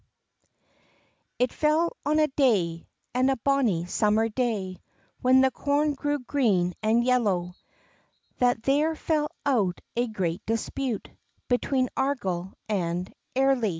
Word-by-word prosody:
IT 250 0 +1
fell 315 +3 +1
on 305 +1 +2
a 310 - +5
day, 200 - +1 0.3
and 255 +2 +2
a 270 - +2
bonnie 235 -9 +1
summer 210 +4 +2
day, 210 -6 -2 0.4
When 260 +1 +5
the 265 0 +3
corn 290 +3 +1
grew 290 +1 -1
green 225 -10 +1
and 220 +2 +3
yellow, 205 -8 +1 0.9
That 245 -2 +2
there 295 +5 +2
fell 305 -1 0 0.2
out 210 -11 +1 0.2
a 240 +1 +1
great 185 -4 -3
dispute 230 +1 -2 0.4
Between 255 +1 +1
Argyle 190 -10 -1 0.2
and 180 -3 -2 0.2
Airly. 265 -4 +3
245 Hz, 120 wpm, -26 LUFS, 195-275 Hz, 0.9 s, a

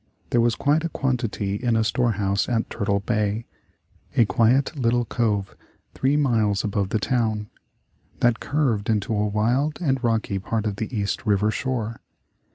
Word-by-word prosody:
There 120 - +4
was 115 -1 +2
quite 150 +3 +2
a 170 - -1
quantity 120 -8 -1
in 120 0 0
a 110 - +3
storehouse 105 -4 0
at 115 -2 -1
Turtle 100 -1 0
Bay, 105 0 -1 0.7
a 115 - +6
quiet 125 +8 +2
little 120 -2 +1
cove 105 -5 -1 0.4
three 135 +3 +1
miles 110 -8 +2
above 100 -2 -1
the 110 - +1
town, 110 0 -1 0.7
that 120 -1 +3
curved 125 -9 0
into 110 0 0
a 105 0 +1
wild 120 +9 +1
and 135 -7 0
rocky 110 -4 0
part 110 +3 -2
of 100 -2 -2
the 110 - -3
East 105 -4 -2
River 105 +1 +3
shore. 115 -1 -2
115 Hz, 160 wpm, -24 LUFS, 105-125 Hz, 0.7 s, a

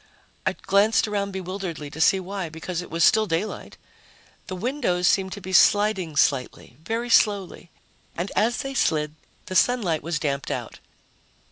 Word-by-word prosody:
I - - +2
glanced 200 +3 +2
around 200 -1 -2
bewilderedly 185 -5 -5
to 160 - -6
see 190 +4 +4
why, 190 -2 -5
because 165 +2 -5
it 180 - -10
was 165 0 0
still 220 -1 +4
daylight. 175 +5 -3 0.7
The 185 - -5
windows 185 -5 0
seemed 190 -1 +2
to 200 - -8
be 190 +1 -7
sliding 205 -5 +3
slightly, 135 -3 0
very 230 +5 -3
slowly, 200 -5 +2 0.5
and 175 +4 -3
as 225 +2 +1
they 270 0 -5
slid, 150 - 0 0.3
the 185 - -6
sunlight 185 -7 +2
was 165 +1 -2
damped 140 -2 -2
out. - - -5
185 Hz, 155 wpm, -24 LUFS, 165-210 Hz, 0.7 s, see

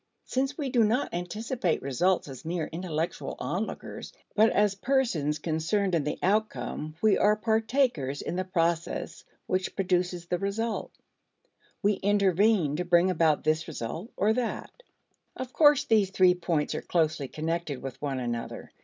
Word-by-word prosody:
Since 270 +2 -1
we 280 -5 -2
do 240 -3 +4
not 230 +6 +1
anticipate 185 +2 -2
results 160 +8 +1
as 135 -3 -9
mere 165 0 -2
intellectual 165 -1 -3
onlookers, - - -4 0.2
but 220 +1 +6
as 205 -1 +2
persons 195 - 0
concerned 170 +5 0
in 165 -3 +2
the 150 - -2
outcome, 195 -6 -1
we 215 -2 +4
are 210 +1 +4
partakers 220 - 0
in - - -3
the 185 - 0
process 170 -2 -1 0.2
which 185 0 -1
produces 180 -2 0
the 175 0 -1
result. 215 +3 -2 0.9
We 205 +1 +4
intervene 200 -5 +3
to 180 - -1
bring 175 +1 +4
about 160 -3 +2
this 155 +1 +1
result 160 - -5
or 210 +2 +3
that. 245 -1 -3 0.6
Of 260 0 -6
course 295 -2 +5
these 220 -8 +3
three 185 -1 +5
points 170 -4 -1
are - - -3
closely 155 -5 0
connected 160 -1 -3
with 135 -2 -7
one 140 -3 -2
another. 120 -2 -4
180 Hz, 150 wpm, -28 LUFS, 160-215 Hz, 0.9 s, but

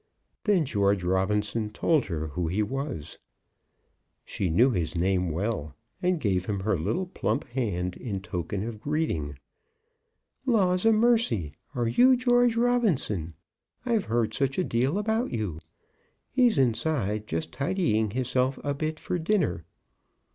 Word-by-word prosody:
Then 195 -7 +3
George 100 -6 +1
Robinson 105 +4 0
told 150 +6 +1
her 80 -4 -3
who 85 +4 -2
he 100 +6 +1
was. 130 - -5 1.1
She 95 - -2
knew 120 +11 +4
his 90 -5 -2
name 90 +1 +1
well, 80 -4 -2 0.3
and 180 -1 +1
gave 95 -7 0
him 100 -2 -2
her 105 +1 +1
little 130 - -1
plump 180 - -2
hand 95 -8 -2
in 105 -6 -4
token 95 0 -4
of 110 -2 -6
greeting. 115 - -1 1.1
"Laws 200 -6 +2
a - - +7
mercy! 215 - +2 0.2
are 120 -2 0
you 255 - +5
George 245 -1 +3
Robinson? 180 - +1 0.5
I've 230 -5 +1
heard 115 -1 0
such 135 -1 0
a 185 - +2
deal 130 +5 0
about 220 +3 0
you. 105 -9 -3 0.7
He's 245 - +3
inside, 115 -4 0
just 80 0 -3
tidying 135 - +1
hisself 130 +3 0
a 145 - 0
bit 155 +2 -3
for 180 - -2
dinner. 160 - 0
115 Hz, 140 wpm, -27 LUFS, -, 1.1 s, a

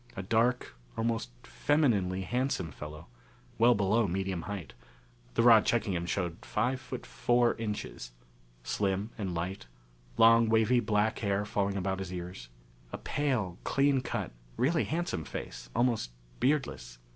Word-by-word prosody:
A 95 - -3
dark, 115 +5 +1 0.2
almost 115 - -1
femininely 95 - +1
handsome 125 - -1
fellow, 75 +3 -9 0.5
well 120 +1 +6
below 105 +2 +2
medium 95 -1 -2
height 100 -5 -5 0.6
the - - +3
rod 115 -3 +8
checking 115 -4 +1
him 85 -1 -2
showed 85 -3 -2
five 130 +1 -1
foot 125 +1 -7
four 120 0 +2
inches. 105 - -5 0.5
Slim 100 - -1
and 100 -4 -3
slight. 90 -1 -4 0.5
Long, 115 0 +6
wavy 110 +2 +4
black 105 -1 +1
hair, 100 -1 0
falling 100 -2 -1
about 95 0 -1
his 95 -2 -5
ears. 90 -8 -7 0.4
A - - -4
pale, 120 -12 -1
clean 140 -1 +2
cut, - - -3 0.3
really 160 +4 +2
handsome 160 - -2
face, - - -7
almost 120 - +1 0.3
beardless. 125 - 0
105 Hz, 135 wpm, -30 LUFS, 90-120 Hz, 0.6 s, rod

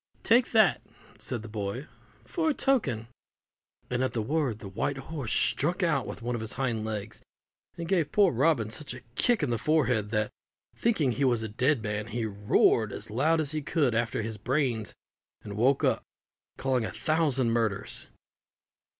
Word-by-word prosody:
"Take 235 +2 +4
that," 215 -8 +4 0.4
said 120 -4 -4
the - - -7
boy, 105 +5 -4 0.4
"for 325 -3 0
a 300 - +1
token" 140 - +1 0.8
and 125 +1 -1
at 130 - -1
the 115 - 0
word 140 -3 0
the 105 - -9
white 100 +8 -2
horse 135 -4 -5
struck 175 +6 +1
out 150 -7 +1
with - - -7
one 120 +1 -1
of 120 - -3
his 110 - -4
hind 120 -4 -1
legs, 110 -1 -5 0.6
and 170 -1 -4
gave 170 -5 +1
poor 200 -3 +5
Robin 125 -4 +2
such 140 -1 -4
a 125 - -10
kick 235 - +2
in 135 - 0
the 115 - 0
forehead 125 -9 +2
that, 110 -1 0 0.4
thinking 165 - +1
he 135 +4 -1
was 120 -4 +2
a - - -2
dead 125 +3 +1
man, 105 0 -2
he 115 0 -2
roared 105 +1 +3
as - - -8
loud 155 +8 +2
as 150 -2 -1
he 155 -1 -1
could 145 -4 +1
after 115 -1 0
his 110 0 -4
brains, 125 -3 0 0.5
and 100 -1 -7
woke 130 +6 +3
up, - - +2 0.6
calling 130 -3 +1
a - - -2
thousand 145 -7 +1
murders. 110 -4 -1
125 Hz, 180 wpm, -28 LUFS, 110-155 Hz, 0.8 s, poor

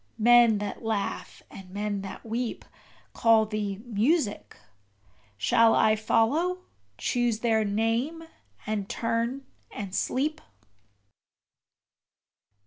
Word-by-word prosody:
Men 235 -1 +6
that 205 -1 -5
laugh 220 -3 -3
and 190 -2 -11
men 205 +1 -3
that 195 +3 -9
weep 230 +1 -3 0.5
Call 225 -1 +4
thee 210 -1 -4
Music 235 - 0 0.8
shall 230 - +4
I 215 - +4
follow, 310 +12 +1 0.3
choose 240 -3 0
their 225 -2 +2
name, 225 +10 -1 0.4
and 210 -2 -3
turn 235 +4 -2 0.2
and 195 -3 -7
sleep? 300 +9 -1
225 Hz, 95 wpm, -27 LUFS, 210-240 Hz, 0.8 s, Men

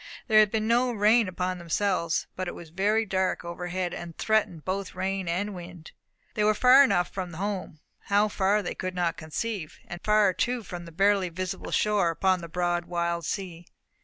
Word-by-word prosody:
There 215 -3 +6
had 215 -1 +5
been 220 +1 -1
no 245 +2 +3
rain 220 0 +4
upon 185 0 -3
themselves, 170 -1 0
but 185 0 -3
it - - -5
was 165 -2 -11
very 210 +5 +1
dark 190 -3 -1
overhead, 175 +1 -3
and 170 -2 -8
threatened 215 -8 0
both 195 0 -3
rain 190 0 -2
and 195 +5 -1
wind. 175 -2 -10 0.4
They 210 - 0
were 215 0 +3
far 255 +4 +7
enough 180 -9 +2
from 185 -3 -5
home 190 -3 -4 0.3
how 205 +1 +3
far 205 0 +1
they 175 - -3
could 185 0 -5
not 175 -2 0
conceive, 165 +2 -5
and 175 - -7
far 210 -2 +4
too 245 +3 -1
from 175 -2 -7
the 170 - -11
barely 195 +1 +2
visible 185 +1 -5
shore, 210 -5 +2
upon 185 +2 +1
the 170 - -8
broad 175 0 -1
wild 170 -1 -2
sea. 175 -4 -5
185 Hz, 190 wpm, -27 LUFS, 175-210 Hz, 0.4 s, far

